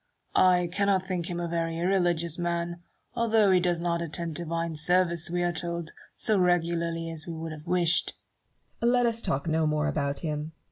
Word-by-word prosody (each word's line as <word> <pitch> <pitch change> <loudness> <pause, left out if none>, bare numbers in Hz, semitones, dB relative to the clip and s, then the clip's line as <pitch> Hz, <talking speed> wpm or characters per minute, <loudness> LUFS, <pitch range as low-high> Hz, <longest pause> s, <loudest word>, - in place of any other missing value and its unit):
I 180 -1 +4
cannot 200 -1 +2
think 180 -3 -3
him 175 -1 -3
a 170 - -2
very 165 -1 -2
irreligious 175 -2 +1
man, 170 0 -2 0.3
although 225 -4 +3
he 185 - +5
does 175 -1 +1
not 170 0 -1
attend 170 0 -3
divine 165 0 -3
service, 170 +1 +2
we 175 0 0
are 175 0 0
told, 170 -1 -3 0.2
so 215 -3 +1
regularly 170 -2 0
as 160 0 -8
we 170 - -4
could 165 0 -5
have 155 +1 -10
wished. 175 -1 +2 0.6
Barrow. 235 +1 +3
Let 245 -1 +3
us 230 -1 +2
talk 140 -4 -2
no 160 0 +2
more 150 0 +1
about 140 -2 -1
him. 155 -1 -3
170 Hz, 185 wpm, -27 LUFS, 165-180 Hz, 0.6 s, he